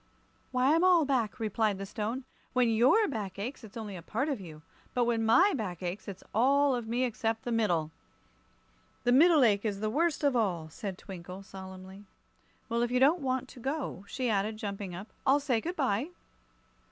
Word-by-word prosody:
"Why, 255 +3 +3
I'm 330 +2 +3
all 355 -4 +5
back," 255 -4 0
replied 215 -2 0
the 195 - -5
Stone. 225 +5 -3 0.3
"When 250 -2 +3
your 255 - +4
back 205 -8 -4
aches, 240 +6 -5
it's 220 +1 -10
only 210 -3 -6
a 175 - -7
part 265 - -2
of 265 -8 -2
you. 155 -4 -11 0.3
But 250 - +3
when 235 -1 +1
my 250 - +5
back 185 -7 -4
aches, 180 +3 -4
it's 195 -2 -8
all 275 +5 +4
of 240 -3 -3
me 240 +3 0
except 225 -2 -1
the 240 - -3
middle." 175 -9 +1 1.1
"The 245 - +3
middle 305 +2 +6
ache 205 -4 +3
is 205 -3 -2
the 215 0 -1
worst 320 +3 +1
of 280 -3 +3
all," 180 -9 0
said 190 +3 -6
Twinkle, 185 0 -9
solemnly. 190 +1 -10 0.6
"Well, 235 0 0
if 240 - +1
you 250 +1 +1
don't 300 +6 +4
want 260 -1 -1
to - - -12
go," 270 - -3
she 255 +2 -2
added, 215 0 0
jumping 200 -4 -5
up, 195 +5 -8
"I'll 275 +1 +4
say 260 -6 0
good 350 +7 -4
bye." 265 - 0
225 Hz, 195 wpm, -30 LUFS, 200-265 Hz, 1.1 s, middle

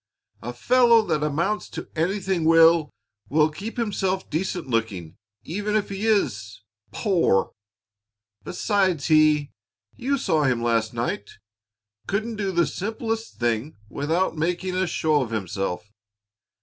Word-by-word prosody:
"A 120 - -5
fellow 235 - +4
that 150 - 0
amounts 170 +8 -1
to - - -7
anything 185 +1 0
will 165 -1 +5 0.4
will 155 +2 +3
keep 210 +10 -7
himself 195 -4 -1
decent 175 0 -2
looking 115 -9 -2 0.3
even 205 +5 -3
if 210 -2 0
he 200 +3 -3
is 105 - 0 0.3
poor. 175 - +1 0.9
Besides 185 - 0
he 155 -2 +4 0.4
you 275 +3 -1
saw 155 - +1
him 125 -3 +1
last 115 -2 +1
night; 115 -3 -3 0.8
couldn't 220 +3 -2
do 200 -2 -1
the 170 -2 +2
simplest 225 - -4
thing 120 +4 -1
without 160 - -1
making 180 +3 -1
a 185 0 +1
show 155 -3 +1
of 125 - -3
himself. 95 -2 -3
165 Hz, 125 wpm, -24 LUFS, 130-200 Hz, 0.9 s, will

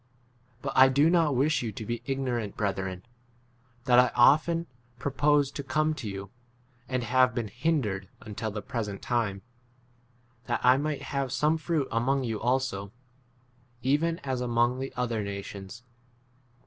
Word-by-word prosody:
But 135 - -3
I 130 0 +8
do 145 +5 +4
not 165 -5 +3
wish 145 +2 +2
you 115 -3 -3
to 110 - -7
be 120 +1 -3
ignorant, 125 -6 -2
brethren, 95 -3 -2 0.8
that 125 -1 +6
I 125 -1 +4
often 155 +7 +4 0.3
proposed 145 +1 +1
to 140 - -4
come 155 +3 +1
to 130 -8 -5
you, 95 0 -7 0.6
(and 130 -1 -1
have 130 0 +3
been 115 -4 -2
hindered 115 - -1
until 110 0 -5
the 105 0 -6
present 105 -5 -4
time,) 110 -5 -1 1.0
that 120 - -1
I 125 +1 +7
might 150 0 -2
have 140 -3 -2
some 150 +4 +2
fruit 160 -3 -1
among 130 +4 +1
you 115 -3 -3
also, 125 -6 -1 0.9
even 155 +5 +1
as 130 -2 -2
among 120 0 +1
14 - - -6
the - - -25
other 120 -3 0
nations. 100 +2 -7
125 Hz, 150 wpm, -28 LUFS, 110-140 Hz, 1.0 s, I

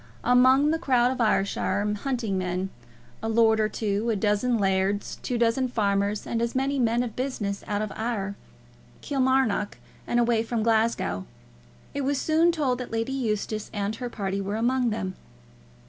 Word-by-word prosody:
Among 260 +4 +5
the 325 - 0
crowd 250 -6 +3
of 255 -2 -3
Ayrshire 205 -1 +1
hunting 240 -7 -1
men, 185 +1 -2 0.5
a 225 - -2
lord 220 -1 +4
or 215 0 +2
two, 210 +1 -1
a 225 - +2
dozen 210 +4 +1
lairds, 195 0 0
two 245 - -2
dozen 235 +3 +2
farmers, 205 -3 0
and 230 - -2
as 235 +1 -1
many 270 +1 0
men 235 0 +2
of 230 -3 -6
business 225 -7 -3
out 205 0 -1
of 215 - -4
Ayr, 215 -4 -2 0.7
Kilmarnock, 260 -6 +1 0.3
and 240 - +2
away 235 -1 +3
from 225 -1 -2
Glasgow, 220 - +1 0.7
it 285 - -2
was 275 0 0
soon 325 +2 +3
told 275 -7 0
that 250 - -5
Lady 230 +3 -2
Eustace 215 -4 -2
and 205 +2 -2
her 245 0 -4
party 195 -3 -3
were 200 +2 -3
among 245 +2 +1
them. 190 -4 -3
225 Hz, 165 wpm, -26 LUFS, 205-250 Hz, 0.7 s, Among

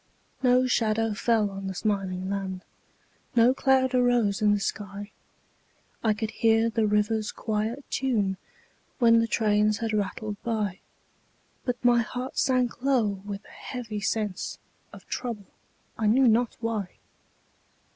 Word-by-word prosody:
No 255 0 +4
shadow 225 -3 +1
fell 215 -1 +1
on 195 0 -6
the 190 - -4
smiling 190 -2 -1
land, 190 -1 -3 0.7
No 240 +2 +6
cloud 265 -1 +2
arose 245 -5 +2
in 210 -1 +4
the 205 - +2
sky; 200 +1 -5 0.9
I 220 -2 +3
could 220 +1 -3
hear 225 0 +3
the 220 -1 +1
river's 210 +1 +1
quiet 220 +5 -3
tune 210 -8 0 0.6
When 230 -2 +5
the 230 - +1
trains 210 -1 +2
had 225 -2 -2
rattled 205 0 -3
by; 215 -5 -2 0.9
But 245 -1 -3
my 240 -1 +5
heart 250 +3 -4
sank 250 -2 +1
low 230 -8 +1
with 200 0 -6
a - - -16
heavy 225 -5 -6
sense 210 -2 -2 0.3
Of - - -13
trouble, 235 -5 -4 0.5
I 220 - +1
knew 255 +4 +5
not 235 +1 +2
why. 220 -5 -3
220 Hz, 135 wpm, -27 LUFS, 205-240 Hz, 0.9 s, No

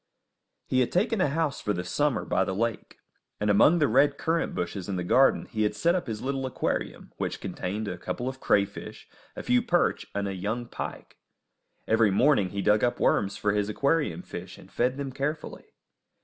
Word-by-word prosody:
He 130 - +1
had 125 - +1
taken 210 +3 +1
a - - +4
house 150 -1 -1
for 105 - -1
the 90 - -3
summer 125 +6 0
by - - +1
the 95 - -3
lake, 115 +1 -3 0.4
and 105 0 +2
among 145 +12 +5
the 150 -4 +3
red 140 +4 +3
currant 165 +1 -1
bushes 90 +1 -4
in 95 - -1
the 90 - -2
garden 135 +9 +4
he 110 - -4
had 105 0 +1
set 170 +11 +2
up 180 -6 -2
his 110 -2 -4
little 135 0 -2
aquarium, 130 - -3
which - - -3
contained 105 +4 -4
a - - -5
couple 120 - -4
of 130 0 -5
crayfish, 100 -4 -1 0.3
a - - -6
few 125 0 +3
perch, - - +1
and 100 0 -1
a 100 - -3
young 105 +6 -3
pike. - - -7 0.7
Every 110 -1 +4
morning 100 -1 +3
he 100 +1 -3
dug 105 +1 +3
up 120 - +1
worms 100 0 +1
for 105 - +1
his 105 0 0
aquarium 150 - 0
fish, 90 - -8
and 95 - -16
fed 125 +2 0
them 140 -1 -4
carefully. 145 +4 -4
115 Hz, 200 wpm, -27 LUFS, 100-140 Hz, 0.7 s, among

